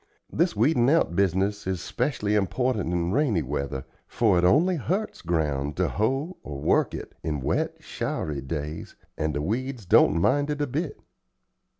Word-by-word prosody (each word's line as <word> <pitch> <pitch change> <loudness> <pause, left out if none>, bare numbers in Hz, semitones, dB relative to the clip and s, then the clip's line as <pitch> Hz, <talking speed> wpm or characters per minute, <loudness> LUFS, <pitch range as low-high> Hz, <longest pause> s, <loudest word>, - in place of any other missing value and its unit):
This 170 -2 +1
weedin' 120 +2 +3
out 155 - +2
business 100 +2 +1
is 95 -2 -1
'specially 120 - -1
important 105 -1 0
in 85 0 0
rainy 115 - +2
weather, 70 -1 -3 0.2
for 105 -7 +2
it - - 0
only 165 - +4
hurts 190 +9 -2
ground 75 -4 -1
to - - +2
hoe 135 - -1
or 70 -2 -7
work - - +2
it - - -8
in 75 -2 -2
wet, 65 - -1
showery 75 -3 -3
days, 75 +3 -5 0.2
and 75 -2 -2
the 75 - -1
weeds 120 - -3
don't 85 - +5
mind 145 - +2
it 150 0 -2
a 145 - +1
bit. 145 +2 -3
100 Hz, 165 wpm, -26 LUFS, -, 0.2 s, don't